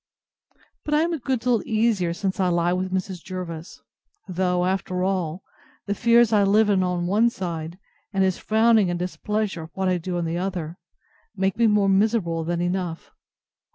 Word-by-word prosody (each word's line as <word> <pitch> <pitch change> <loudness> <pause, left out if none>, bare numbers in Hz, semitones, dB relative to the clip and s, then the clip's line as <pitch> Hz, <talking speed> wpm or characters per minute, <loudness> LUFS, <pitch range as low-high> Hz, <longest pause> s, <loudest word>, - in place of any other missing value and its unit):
But 300 - 0
I 300 - +4
am 340 +1 0
a 325 - -2
good 255 -1 -1
deal 240 -2 +2
easier 215 -6 +1
since 190 +3 -3
I 185 - +2
lie 175 0 +1
with 185 +1 -2
Mrs. 185 -2 -3
Jervis; 175 -3 -7 0.4
though, 180 -1 0
after 185 -1 -1
all, 185 -2 -2 0.4
the 200 - -1
fears 235 +1 +4
I 210 - +5
live 205 +2 +4
in 190 -2 +3
on 180 -1 -1
one 210 +6 +3
side, 170 -5 -5 0.3
and 195 -2 +1
his 190 -1 0
frowning 220 -2 +3
and 175 - -1
displeasure 190 0 -3
at - - -14
what 190 -1 0
I 180 -1 +1
do 175 +1 -3
on 170 - -1
the 165 +1 -2
other, 180 -3 -4 0.6
make 190 -1 0
me 230 -1 +3
more 210 -2 +3
miserable 195 -4 +1
than 170 +1 -2
enough. 175 -2 -3
190 Hz, 185 wpm, -24 LUFS, 175-210 Hz, 0.6 s, I